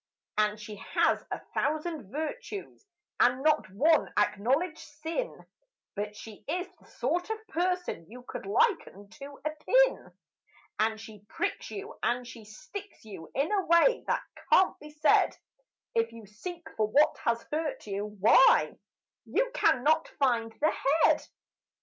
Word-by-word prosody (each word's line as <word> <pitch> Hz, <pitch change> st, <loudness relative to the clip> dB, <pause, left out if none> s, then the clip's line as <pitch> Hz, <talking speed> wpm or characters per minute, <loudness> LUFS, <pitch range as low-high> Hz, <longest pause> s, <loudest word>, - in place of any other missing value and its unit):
And 210 Hz, 0 st, +1 dB
she 210 Hz, 0 st, -8 dB
has -, -, +1 dB
a -, -, -4 dB
thousand 305 Hz, -, -2 dB
virtues 405 Hz, -, -6 dB, 0.3 s
and 250 Hz, +2 st, +3 dB
not 305 Hz, -10 st, +3 dB
one 305 Hz, -, +3 dB
acknowledged 260 Hz, -, +1 dB
sin, 320 Hz, +11 st, -5 dB, 0.5 s
But 210 Hz, +1 st, -4 dB
she 215 Hz, 0 st, -11 dB
is 355 Hz, +4 st, -2 dB
the -, -, -22 dB
sort 345 Hz, -, -2 dB
of 440 Hz, 0 st, -4 dB
person 355 Hz, -, -1 dB
you 245 Hz, +2 st, -11 dB
could 205 Hz, -, -7 dB
liken 205 Hz, -, +1 dB
to 280 Hz, +3 st, -11 dB
a 305 Hz, -, +1 dB
pin, -, -, +2 dB, 0.7 s
And 220 Hz, 0 st, +1 dB
she 215 Hz, -2 st, -11 dB
pricks -, -, -3 dB
you, 415 Hz, +3 st, -8 dB
and 245 Hz, +1 st, 0 dB
she 230 Hz, -2 st, -11 dB
sticks 380 Hz, -, -10 dB
you, 190 Hz, -7 st, -9 dB
in 280 Hz, +7 st, +1 dB
a 400 Hz, -2 st, +2 dB
way 340 Hz, +9 st, +5 dB
that -, -, 0 dB, 0.3 s
can't 375 Hz, -, +5 dB
be 300 Hz, -, -11 dB
said 300 Hz, +1 st, +3 dB, 0.6 s
When 460 Hz, -1 st, +2 dB
you 230 Hz, -2 st, -12 dB
seek 330 Hz, -, -8 dB
for 215 Hz, -1 st, +2 dB
what 285 Hz, +8 st, +3 dB
has 235 Hz, 0 st, -1 dB
hurt 305 Hz, 0 st, -2 dB
you, 200 Hz, 0 st, -3 dB
why, 210 Hz, -, +5 dB, 0.5 s
you -, -, 0 dB
cannot 305 Hz, +5 st, +3 dB
find 235 Hz, -5 st, +1 dB
the 310 Hz, +2 st, +3 dB, 0.3 s
head. -, -, +3 dB
290 Hz, 145 wpm, -29 LUFS, 215-350 Hz, 0.7 s, way